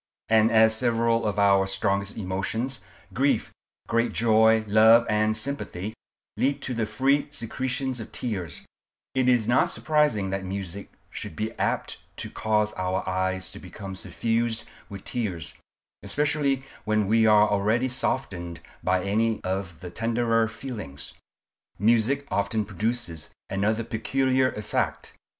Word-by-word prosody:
And 110 0 +5
as 110 -1 +5
several 115 -1 +1
of 105 -1 -2
our 100 -1 +4
strongest 100 0 0
emotions—grief, 110 +6 -2 0.3
great 115 0 +1
joy, 110 -1 +4
love, 110 +3 +6
and 110 0 +2
sympathy—lead 125 +3 -4
to 130 - -3
the 115 -2 -1
free 140 +4 +2
secretion 130 +1 -3
of - - -9
tears, 95 - -4 0.5
it 130 -1 +2
is 120 -4 +3
not 120 +2 +3
surprising 150 -11 +1
that 95 0 -2
music 95 0 -5 0.2
should - - -7
be 110 +6 -2
apt - - -1 0.2
to - - -6
cause 105 -1 0
our 95 +1 -2
eyes 95 0 -1
to - - -10
become 95 +1 -8
suffused 115 +3 -1 0.3
with 100 -2 -9
tears, 95 - -3 0.5
especially 145 -2 0 0.2
when 110 -1 +1
we 110 +2 +4
are 105 -1 +6
already 105 +5 +1
softened 90 -10 -2 0.2
by 90 0 +1
any 110 +2 +1
of 95 -3 -3
the 90 -2 -7
tenderer 115 +1 +1
feelings. 110 - -6 0.6
Music 120 +7 +2
often 105 +1 0
produces 105 -5 -3 0.2
another 110 +4 +1
peculiar 130 +3 +1
effect. 105 - -2
110 Hz, 130 wpm, -26 LUFS, 100-120 Hz, 0.6 s, love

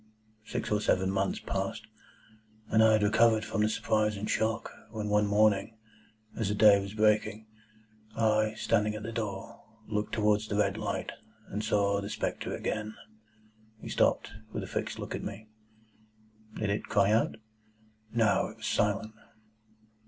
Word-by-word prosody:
Six - - -3
or 105 0 +2
seven 95 -2 +2
months 95 0 0
passed, 95 +3 -3 0.8
and 110 0 +5
I 110 0 +6
had 110 -1 +3
recovered 110 +1 +4
from 110 0 -1
the 105 - +3
surprise 105 -1 0
and 105 - -4
shock, 110 +1 -1 0.2
when 105 -1 -4
one 105 0 +3
morning, 105 +1 +2 0.6
as 110 -4 -1
the 105 - 0
day 105 -1 +6
was 100 +2 -7
breaking, 110 0 +2 0.7
I, 110 -1 +2
standing 105 -1 +1
at 110 - -6
the 115 - -5
door, 105 -4 -5 0.3
looked 105 -1 -2
towards 105 -1 +2
the 105 - -2
red 100 -1 +2
light, 110 -1 -3 0.4
and 105 +2 -3
saw 100 -1 +1
the 100 - -5
spectre - - -3
again." 110 0 -3 0.8
He - - -8
stopped, - - +1 0.2
with - - -4
a - - -6
fixed - - -3
look - - -5
at - - -4
me. 110 +2 -7 1.1
"Did 105 -2 -1
it 100 - -2
cry 100 0 +3
out?" 110 +1 +2 0.8
"No. 115 -3 +2
It - - -12
was - - -8
silent." 105 +1 0
105 Hz, 160 wpm, -30 LUFS, 105-110 Hz, 1.1 s, I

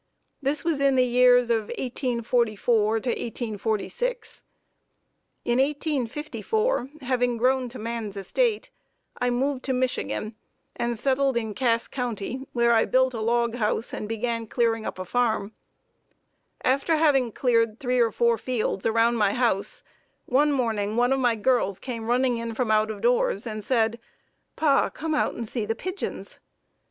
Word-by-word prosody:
This 280 +2 -1
was 320 -4 0
in 275 -1 +4
the 255 -1 +4
years 245 0 +4
of 220 -2 +1
1844 235 -3 0
to 250 - -2
1846. 235 - -3 1.0
In 240 +1 +1
1854, 295 - -1
having 245 -2 0
grown 255 +1 +1
to 250 - -10
man's 225 -3 -5
estate, 425 - 0 0.5
I 250 - +1
moved 260 +2 0
to 265 - 0
Michigan 250 -3 -2 0.4
and 235 -1 -2
settled 270 +1 +1
in 220 -2 -2
Cass 230 -1 +1
County, 250 +1 -4
where 235 -1 +3
I 225 - +4
built 260 0 +2
a 225 - -4
log 235 +1 +1
house 220 0 -1
and 210 - -5
began 230 0 -2
clearing 225 -1 0
up - - -5
a 185 - -5
farm. 220 -2 0 1.1
After 275 +5 +2
having 280 -6 +3
cleared 230 -2 +1
three 250 -1 0
or 230 -2 +3
four 235 -1 +2
fields 225 -5 -1
around 230 +1 +3
my 205 -2 +2
house, 235 -6 0 0.4
one 290 +4 +3
morning 220 -6 -1
one 245 +2 +3
of 270 - 0
my 245 -3 +2
girls 215 -4 +1
came 230 0 -6
running 245 0 +2
in 230 -1 -4
from 240 -2 0
out 215 0 +3
of 210 -2 -6
doors 240 -3 +1
and 215 -2 -5
said: 230 -1 +1 0.6
"Pa, 285 -3 +3
come 320 0 -4
out 295 - 0
and 230 - -5
see 230 0 -3
the 225 +2 -2
pigeons." 370 - -6
240 Hz, 155 wpm, -25 LUFS, 225-260 Hz, 1.1 s, in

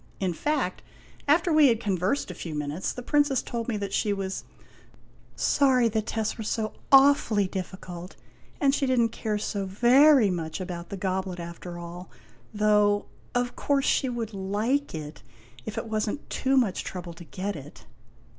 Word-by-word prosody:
In 185 -3 0
fact, 275 - -1 0.5
after 330 +4 +3
we 305 -2 +7
had 230 -3 +3
conversed 195 +2 -1
a - - -6
few 165 -2 -6
minutes, 150 +4 -2
the 250 - -7
Princess 290 -1 +2
told 230 -1 -4
me 230 -4 -1
that 200 -1 -4
she 210 - +1
was 195 -1 -4 0.9
"sorry 255 -4 +3
the 220 0 0
tests 220 +1 -3
were - - -3
so 215 0 -2 0.2
awfully 270 -7 +5
difficult, 185 -1 -7 0.4
and 275 -1 +3
she 275 -1 +1
did 255 -1 +2
n't 230 -1 +3
care 215 -2 -2
so 200 -2 -3
very 245 +3 +5
much 165 -2 -4
about 175 -2 -6
the 200 - -5
goblet 185 -1 -2
after 170 +1 -7
all, 175 +1 -8 0.4
though, 210 -1 +3 0.3
of 245 0 0
course 280 -1 +1
she 265 - +2
would 230 -3 -4
like 210 +7 -1
it, 150 -1 -7 0.5
if 215 - -5
it - - -3
was 215 -1 -1
n't 285 - -6
too 270 0 +1
much 230 -8 +1
trouble 175 -2 -6
to 165 - -11
cret 195 +5 -4
it." 145 0 -11
210 Hz, 175 wpm, -27 LUFS, 185-250 Hz, 0.9 s, we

